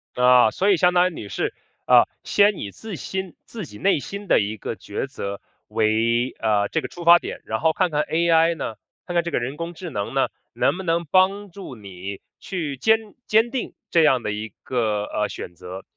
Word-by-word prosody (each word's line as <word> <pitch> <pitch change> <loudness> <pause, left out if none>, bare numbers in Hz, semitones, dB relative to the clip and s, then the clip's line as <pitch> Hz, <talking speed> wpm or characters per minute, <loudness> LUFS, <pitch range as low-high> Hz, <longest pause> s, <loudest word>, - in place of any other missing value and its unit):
啊， 125 -2 +6
所 200 - +2
以 190 - +4
相 180 +1 +4
当 180 0 +4
于 - - -11
你 110 - -7
是， - - -2 0.3
呃， - - +7 0.2
先 205 -1 +3
以 100 - -5
自 220 - -8
心 190 +1 -5
自 220 -5 -7
己 105 -8 -12
内 195 - +2
心 200 +7 -7
的 - - +5
一 105 +1 -1
个 110 - -5
抉 100 +7 -4
择 100 -8 -6 0.3
为， 115 +3 +1
呃， 105 -2 +1
这 160 - 0
个 - - -5
出 175 - -10
发 170 +1 +8
点， - - -7
然 110 - -2
后 160 0 +2
看 180 -1 +1
看 150 0 +1
AI 165 0 +3
呢， 125 -7 -4 0.3
看 175 - -5
看 170 -1 +2
这 170 - -3
个 - - +1
人 130 +4 -4
工 170 +1 -5
智 175 +1 -7
能 100 -8 -4
呢， - - +2 0.2
能 - - +1
不 190 - -5
能 170 -1 0
帮 190 +4 +2
助 185 -8 -9
你 100 -2 -8 0.2
去 160 -8 -4
坚 220 +11 +4 0.3
坚 225 +2 +3
定 260 -2 -3 0.2
这 165 - +5
样 130 -5 +4
的 105 - -2
一 105 +1 -5
个， 110 -5 0
呃， 105 0 -1
选 90 - -7
择。 90 +2 -9
155 Hz, 235 characters per minute, -23 LUFS, 110-180 Hz, 0.3 s, 发